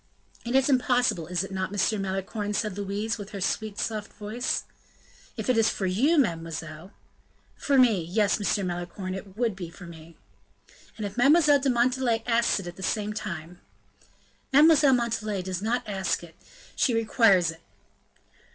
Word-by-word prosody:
"It 240 +2 -2
is 270 0 +4
impossible, 245 - +2
is 180 +1 -1
it 195 - -8
not, 190 -1 -2 0.2
M. 210 - -2
Malicorne?" 195 +2 -3
said 210 -2 -1
Louise, 205 +3 -3
with 205 -1 -7
her 200 - -5
sweet, 210 +2 -2
soft 215 -2 -3
voice. 220 +4 -3 0.7
"If - - -4
it 250 -3 +3
is 225 - +4
for 195 - -3
you, 250 - +2
mademoiselle 165 - -2 0.4
" - - -37
"For 280 -2 +3
me. 235 -8 +5
Yes, 200 +6 +1
Monsieur 205 0 0
Malicorne, 180 +1 -4
it 195 +1 -9
would 230 -4 0
be 180 -3 -7
for 180 +2 -12
me." 165 -1 -13 0.8
"And 215 - -4
if 200 +3 -7
Mademoiselle 290 +3 +5
de 275 0 0
Montalais 245 -1 +1
asks 235 -2 +2
it 195 - -7
at 175 0 -8
the - - -10
same 210 +2 -1
time 175 -5 -6 0.4
" - - -34
"Mademoiselle 295 -1 +6
de - - +4
Montalais 220 -5 -2
does 185 0 -4
not 230 +3 -1
ask 190 -4 -1
it, 165 -1 -12 0.4
she 245 - +2
requires 215 -6 +3
it." 165 - -15
210 Hz, 175 wpm, -26 LUFS, 185-240 Hz, 0.8 s, Mademoiselle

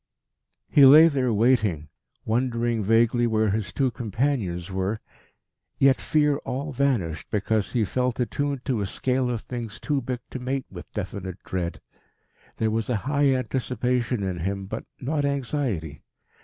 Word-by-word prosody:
He 145 - +5
lay 150 +5 +10
there 130 -5 0
waiting, 105 - +2 0.4
wondering 115 -1 0
vaguely 115 +3 +3
where 110 -2 +2
his 105 -3 -2
two 130 +6 +1
companions 110 -6 -2
were, 95 +3 -1 0.8
yet 135 -1 +4
fear 150 -1 +2
all 140 +3 -4
vanished 120 - 0
because 105 0 0
he 115 -4 +2
felt 125 +4 -1
attuned 140 +2 -2
to 125 -6 0
a 100 - -1
scale 125 +5 0
of 120 -3 -2
things 120 -3 -6
too 145 -3 -1
big 125 0 -4
to 130 - -5
mate 130 +1 -2
with 90 -2 -10
definite 95 -3 -5
dread. 90 -2 -3 0.8
There 110 -1 +1
was 110 0 -1
high 135 +4 +1
anticipation 125 -2 -1
in 95 -2 -2
him, 100 +3 -3
but 95 - -6
not 145 +3 -1
anxiety. 130 - -2
120 Hz, 145 wpm, -25 LUFS, 100-130 Hz, 0.8 s, lay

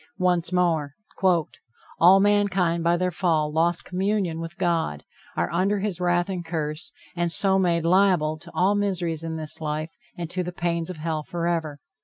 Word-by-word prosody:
Once 180 -2 +1
more: 165 -5 +1 1.0
"All 185 +3 +7
mankind 195 -4 +2
by 170 +1 +3
their 180 +1 0
fall 160 -4 +1
lost 170 +2 +1
communion 185 -2 -1
with 165 0 -7
God, 165 - -1 0.3
are - - -1
under 190 +4 +1
his 195 -3 -3
wrath 175 0 +2
and 185 -3 -4
curse, 160 -1 -3 0.2
and 175 -1 0
so 190 +2 +3
made 170 -3 +1
liable 175 -4 +3
to 170 - -9
all 190 +3 +3
miseries 180 -6 -1
in 165 -1 -4
this 155 0 -4
life 155 +1 -3 0.3
and 170 -1 -4
to 180 - -1
the 180 0 -4
pains 170 -1 -2
of 180 - -6
hell 155 0 -2
forever." 165 -3 -3
170 Hz, 170 wpm, -24 LUFS, 160-185 Hz, 1.0 s, All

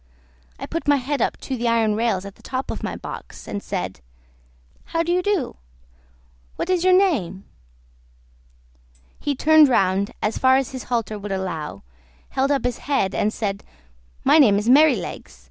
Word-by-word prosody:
I - - -6
put 330 -1 -5
my 290 - +5
head 275 0 -2
up - - 0
to 265 - -4
the 240 -1 -2
iron 225 -2 +2
rails 210 -4 0
at 200 - -8
the - - -22
top 260 0 -4
of - - -6
my - - -4
box, - - -9
and 205 - -4
said, 95 - -4 0.9
"How 330 0 -1
do 340 - -2
you 360 +1 +2
do? 380 -8 -1 1.0
What 370 - -2
is 360 -2 +1
your 370 - +4
name?" 220 - 0 1.7
He 290 -1 -2
turned 310 +1 +6
round 195 -3 +2
as 215 - -2
far 260 0 +5
as 270 -2 -2
his 260 -2 -7
halter 230 -3 -2
would 205 0 -6
allow, 175 - -4 0.5
held 270 +1 0
up 280 -3 0
his 245 -1 -1
head, 200 -9 +1
and 210 - +1
said, 200 -3 -3 0.6
"My 315 - +5
name 215 -9 +6
is 210 +2 -2
Merrylegs. 300 +5 +2
245 Hz, 175 wpm, -22 LUFS, 200-290 Hz, 1.7 s, turned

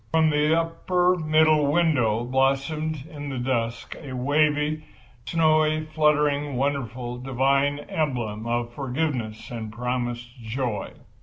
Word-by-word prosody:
From 160 -1 +4
the - - 0
middle 150 +2 +3
upper 175 +2 +1
window 155 -7 +3
blossomed 135 +3 0
in 145 -2 -6
the 135 - -4
dusk 115 -2 -2
a 140 -4 -7
waving, 150 +3 +1 0.5
snowy, 155 -1 +2
fluttering, 150 -2 +2
wonderful, 125 -2 -2
divine 135 +2 +1
emblem 120 -8 -2
of 120 0 -1
forgiveness 130 -5 -3
and 110 -3 -5
promised 120 +1 -4
joy. 115 -2 -3
140 Hz, 110 wpm, -25 LUFS, 120-155 Hz, 0.5 s, From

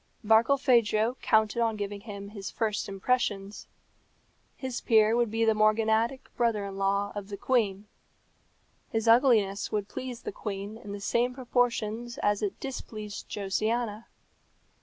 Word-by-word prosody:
Barkilphedro 235 -1 +3
counted 220 +1 +2
on 225 -1 +1
giving 205 -1 -5
him 200 -2 -8
his 200 -2 -7
first 215 -2 -2
impressions. 200 -1 -1 0.9
His 260 -2 -4
peer 220 -1 +4
would 240 -1 +2
be 225 +1 +1
the 220 - +4
morganatic 220 +3 +2
brother 230 -4 +1
in 195 -1 -7
law 200 +1 0
of 205 -1 -6
the 200 - -5
queen. 205 -4 0 1.0
His 225 -2 -1
ugliness 225 -5 +4
would 205 -2 -1
please 250 0 -6
the - - -4
queen 200 +1 -5
in 205 - -9
the 200 - -5
same 240 +5 0
proportion 240 -3 0
as 205 0 +2
it 205 -2 -3
displeased 215 -6 -7
Josiana. 215 +2 -1
215 Hz, 140 wpm, -28 LUFS, 205-235 Hz, 1.0 s, peer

